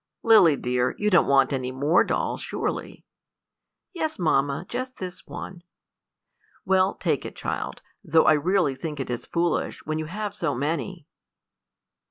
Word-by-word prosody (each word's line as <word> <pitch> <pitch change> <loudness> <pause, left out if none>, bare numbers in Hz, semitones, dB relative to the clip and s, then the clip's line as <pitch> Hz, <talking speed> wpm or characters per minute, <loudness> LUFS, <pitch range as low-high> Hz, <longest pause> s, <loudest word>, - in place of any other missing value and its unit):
"Lily 215 -10 +6
dear, 125 -1 -1
you 210 0 0
don't 175 - +5
want 135 0 +4
any 130 -1 -2
more 145 +6 +3
dolls, - - -2
surely." - - -4 0.9
"Yes, 315 -3 -2
mamma, 145 -2 +1
just 255 +1 -5
this 185 -1 -8
one." 180 -2 -8 1.0
"Well, 190 0 +3
take - - -1
it, - - -8
child, - - -4 0.2
though 160 0 +4
I 155 - +6
really 165 0 +2
think 150 +1 -6
it 135 - -3
is 120 - -5
foolish, 170 -1 -1
when 155 0 -2
you 155 - -3
have 205 +5 -4
so 165 -9 -2
many." 160 +5 -3
165 Hz, 150 wpm, -25 LUFS, 140-190 Hz, 1.0 s, Lily